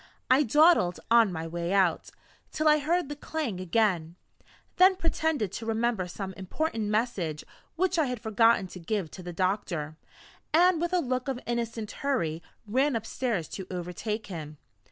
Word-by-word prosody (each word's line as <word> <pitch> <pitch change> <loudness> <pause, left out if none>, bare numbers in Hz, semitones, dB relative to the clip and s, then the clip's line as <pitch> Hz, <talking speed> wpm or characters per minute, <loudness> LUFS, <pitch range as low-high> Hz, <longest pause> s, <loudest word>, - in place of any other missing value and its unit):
I 260 +3 +6
dawdled 295 - +4
on 230 -4 +6
my 160 -1 -4
way 170 +1 -3
out, 190 -4 +2 0.4
till 310 0 0
I 305 0 +6
heard 330 +2 0
the 290 - -5
clang 290 - -4
again; 180 -3 0 0.6
then 375 +1 +7
pretended 320 - 0
to 225 - -6
remember 225 -4 0
some 190 +1 -6
important 220 - -3
message 205 -8 -1 0.3
which 365 0 +1
I 305 - +2
had 250 -2 -3
forgotten 220 -1 +3
to 180 - -9
give 180 -1 -2
to 185 - -9
the 175 0 -6
doctor, 175 -4 -2 0.6
and 350 0 +5
with 345 - -1
a 360 -1 +2
look 255 -2 -2
of 265 -2 -2
innocent 230 -2 -3
hurry 170 - -1 0.2
ran 260 +6 +1
upstairs 225 - -2
to 190 -2 -7
overtake 185 +5 -4
him. 155 -5 -7
220 Hz, 160 wpm, -28 LUFS, 180-280 Hz, 0.6 s, then